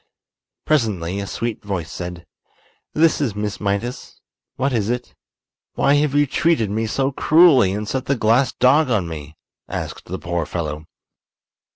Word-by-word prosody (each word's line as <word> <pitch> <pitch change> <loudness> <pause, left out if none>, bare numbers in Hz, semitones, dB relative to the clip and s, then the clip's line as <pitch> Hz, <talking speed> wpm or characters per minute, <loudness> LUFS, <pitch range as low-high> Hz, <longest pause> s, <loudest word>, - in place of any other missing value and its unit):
Presently 100 - 0
a 100 - -4
sweet 115 +1 -3
voice 95 -6 -4
said: 90 -1 -7 0.7
"This 160 0 +3
is 120 -8 -1
Miss 105 -1 -3
Mydas. 100 +5 -3 0.4
What 135 +1 0
is 110 -3 0
it?" 125 0 -3 0.6
"Why 140 - +3
have 145 -1 +2
you 145 0 +4
treated 140 -7 +1
me 110 +2 -1
so 135 +5 0
cruelly 145 - +5
and 105 +1 -4
set 130 +3 -2
the 140 - +1
glass 115 +3 +3
dog 140 +4 +3
on 105 -8 +1
me?" 75 -1 -8 0.3
asked - - -5
the - - -5
poor 85 -1 -3
fellow. 80 -2 -4
110 Hz, 155 wpm, -21 LUFS, 95-135 Hz, 0.7 s, cruelly